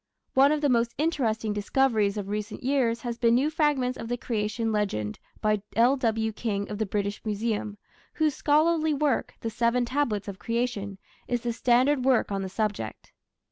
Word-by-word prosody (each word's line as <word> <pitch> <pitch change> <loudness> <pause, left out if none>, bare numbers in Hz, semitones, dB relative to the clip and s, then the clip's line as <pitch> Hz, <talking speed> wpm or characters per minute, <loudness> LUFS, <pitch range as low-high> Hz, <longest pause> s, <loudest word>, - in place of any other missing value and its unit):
One 275 +2 +6
of 305 -1 0
the 290 - +3
most 235 -2 +1
interesting 230 -9 0
discoveries 210 -1 +1
of 200 -2 -4
recent 210 +2 -4
years 245 -4 +1
has 240 -1 -4
been 235 -1 +4
new 280 +5 +2
fragments 290 -5 +1
of 225 - -5
the 245 +1 -2
Creation 225 -1 -2
Legend 195 - -1 0.2
by 215 -1 +1
L.W. 230 -2 +2
King 205 -2 -2
of 210 - -4
the 220 - 0
British 205 +1 -2
Museum, 210 -1 -2 0.4
whose 310 -2 +1
scholarly 310 +2 +2
work, 285 -2 0
The 225 - -3
Seven 235 +2 +1
Tablets 240 -6 -1
of 200 -1 -6
Creation, 230 -4 -2 0.3
is 245 -1 -1
the 235 -1 -2
standard 255 +3 +3
work 255 -5 +2
on 195 -1 -1
the 190 - -4
subject. 205 - -3
230 Hz, 175 wpm, -27 LUFS, 210-265 Hz, 0.4 s, One